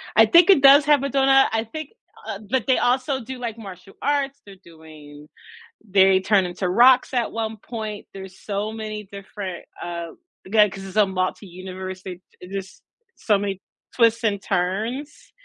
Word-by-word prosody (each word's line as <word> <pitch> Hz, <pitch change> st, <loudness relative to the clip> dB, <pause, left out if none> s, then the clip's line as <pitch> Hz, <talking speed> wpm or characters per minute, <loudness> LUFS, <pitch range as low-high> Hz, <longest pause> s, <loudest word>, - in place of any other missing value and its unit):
I 225 Hz, -, +7 dB
think 340 Hz, -, +5 dB
it 375 Hz, -8 st, +6 dB
does 280 Hz, +1 st, +7 dB
have 290 Hz, -2 st, +3 dB
a 280 Hz, -, -1 dB
donut. 270 Hz, 0 st, +4 dB
I 225 Hz, 0 st, 0 dB
think, 310 Hz, -2 st, -6 dB, 0.4 s
uh 200 Hz, -, -5 dB
but 260 Hz, 0 st, 0 dB
they 260 Hz, -, +3 dB
also 265 Hz, +2 st, 0 dB
do, 260 Hz, +2 st, -8 dB
like, 235 Hz, -2 st, -5 dB
martial 195 Hz, -3 st, -11 dB
arts. 280 Hz, -1 st, -1 dB
They're 200 Hz, -1 st, -13 dB
doing 155 Hz, -3 st, -15 dB, 0.6 s
they 190 Hz, -1 st, +4 dB
turn 195 Hz, 0 st, +2 dB
into 180 Hz, +1 st, -4 dB
rocks 250 Hz, +8 st, +5 dB
at 240 Hz, -3 st, 0 dB
one 225 Hz, -1 st, -4 dB
point. 215 Hz, -1 st, -7 dB
There's 190 Hz, -1 st, -11 dB
so 205 Hz, +1 st, -4 dB
many 215 Hz, -2 st, -7 dB
different, 195 Hz, -2 st, -8 dB, 0.2 s
uh 170 Hz, -1 st, -5 dB, 0.4 s
again, 210 Hz, +1 st, +4 dB
'cause 195 Hz, -, -9 dB
it's 190 Hz, +2 st, -8 dB
a 210 Hz, -, +6 dB
multi-universe, 185 Hz, 0 st, -5 dB
they 180 Hz, -2 st, -8 dB, 0.2 s
they 180 Hz, -, -10 dB
just 195 Hz, 0 st, -7 dB, 0.3 s
so 210 Hz, -3 st, +1 dB
many 195 Hz, -1 st, -4 dB, 0.3 s
twists 230 Hz, -1 st, +3 dB
and 205 Hz, -3 st, 0 dB
turns 215 Hz, +11 st, -3 dB
210 Hz, 170 wpm, -22 LUFS, 190-250 Hz, 0.6 s, I